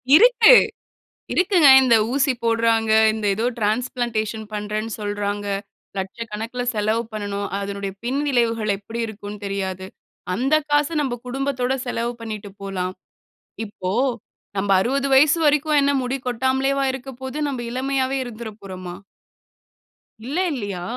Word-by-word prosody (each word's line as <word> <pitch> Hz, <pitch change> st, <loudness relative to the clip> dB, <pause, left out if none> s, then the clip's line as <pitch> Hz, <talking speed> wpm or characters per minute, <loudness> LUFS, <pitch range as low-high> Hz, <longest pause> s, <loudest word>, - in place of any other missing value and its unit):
.இருக்கு, 475 Hz, +5 st, +7 dB, 0.8 s
இருக்குங்க. 360 Hz, -5 st, +4 dB
இந்த 245 Hz, -3 st, +5 dB, 0.2 s
ஊசி 275 Hz, 0 st, +2 dB
போடுறாங்க, 230 Hz, -1 st, +2 dB, 0.2 s
இந்த 215 Hz, -1 st, -3 dB
ஏதோ 225 Hz, +4 st, -1 dB
டிரான்ஸ்ப்ளான்டேஷன் 220 Hz, -1 st, -1 dB
பண்ணுறேன்னு 210 Hz, +1 st, -3 dB
சொல்றாங்க. 205 Hz, 0 st, -3 dB, 0.5 s
லட்சக்கணக்குல 225 Hz, +5 st, -4 dB
செலவு 215 Hz, +2 st, +1 dB
பண்ணணும். 205 Hz, -1 st, -3 dB
அதனுடைய 200 Hz, -1 st, -4 dB
பின் 265 Hz, +4 st, 0 dB
விளைவுகள் 230 Hz, -4 st, +1 dB
எப்படி 225 Hz, +3 st, -6 dB
இருக்கும்ன்னு 205 Hz, -1 st, -8 dB
தெரியாது. 190 Hz, -1 st, -3 dB, 0.5 s
அந்த 265 Hz, +9 st, +1 dB, 0.2 s
காச 290 Hz, 0 st, +3 dB
நம்ப 260 Hz, -4 st, -2 dB
குடும்பத்தோட 260 Hz, 0 st, -1 dB
செலவு 240 Hz, 0 st, -2 dB
பண்ணீட்டு 215 Hz, -3 st, -6 dB
போலாம். 185 Hz, -2 st, -3 dB, 0.7 s
இப்போ 195 Hz, -3 st, -5 dB, 0.7 s
நம்ப 195 Hz, +1 st, 0 dB
60 275 Hz, +5 st, 0 dB
வயசு 295 Hz, +4 st, +6 dB
வரைக்கும் 295 Hz, 0 st, +3 dB
என்ன 280 Hz, -, +3 dB
முடி 255 Hz, +2 st, -2 dB
கொட்டாமலேவா 265 Hz, +3 st, +1 dB
இருக்க 265 Hz, 0 st, -7 dB
போது? 265 Hz, +2 st, -5 dB
நம்ப 260 Hz, -3 st, -4 dB
இளமையாவே 265 Hz, +1 st, 0 dB
இருந்துற 235 Hz, -2 st, -7 dB
போறோமா? 185 Hz, -2 st, -7 dB, 1.3 s
இல்ல, 275 Hz, +7 st, -4 dB, 0.2 s
இல்லியா? 205 Hz, -8 st, -4 dB
230 Hz, 120 wpm, -22 LUFS, 205-265 Hz, 1.3 s, இருக்கு